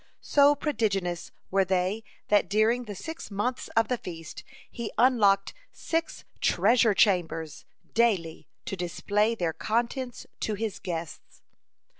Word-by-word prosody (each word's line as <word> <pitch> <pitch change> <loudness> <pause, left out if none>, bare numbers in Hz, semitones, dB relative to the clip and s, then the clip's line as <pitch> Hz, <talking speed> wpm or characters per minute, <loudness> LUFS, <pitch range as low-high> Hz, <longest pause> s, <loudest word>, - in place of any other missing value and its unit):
So 290 0 +5
prodigious 200 - -1 0.2
were 195 0 +4
they 190 +3 0 0.3
that 205 -1 +3
during 220 +4 +2
the 205 -2 -7
six 320 - -7
months 225 +5 -2
of 225 -1 +4
the 250 -2 -1
feast 165 -3 -8 0.3
he 235 -2 -5
unlocked 210 -6 +4 0.2
six 330 0 -3
treasure 220 +3 +3
chambers 165 -6 +1 0.3
daily 200 -9 +1 0.2
to - - -3
display 205 +5 0
their 175 -6 -1
contents 240 - -2
to 215 - -1
his 215 -1 -3
guests. 170 -5 -7
210 Hz, 125 wpm, -27 LUFS, 185-235 Hz, 0.3 s, So